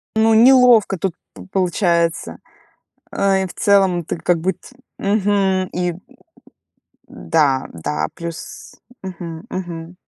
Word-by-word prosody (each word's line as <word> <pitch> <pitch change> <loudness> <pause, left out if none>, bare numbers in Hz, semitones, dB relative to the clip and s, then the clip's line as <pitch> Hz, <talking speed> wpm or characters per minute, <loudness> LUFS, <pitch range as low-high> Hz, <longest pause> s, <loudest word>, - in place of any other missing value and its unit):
Ну, 220 0 +3
неловко 240 -3 +5
тут 185 0 -2 0.2
п - - -12
получается. 175 -3 0 0.7
Э, 195 -1 +1
и - - -3
в - - -11
целом 195 -4 +2
ты - - -4
как 170 +1 0
будь 180 +2 -2 0.4
Мгм. 195 -2 +1
И 180 0 -1 1.2
да, 140 -5 0
да, 75 -2 -3
плюс 170 -1 -8 0.3
мгм. 170 -3 -8
Мгм. 175 -1 -6
180 Hz, 115 wpm, -19 LUFS, 170-195 Hz, 1.2 s, неловко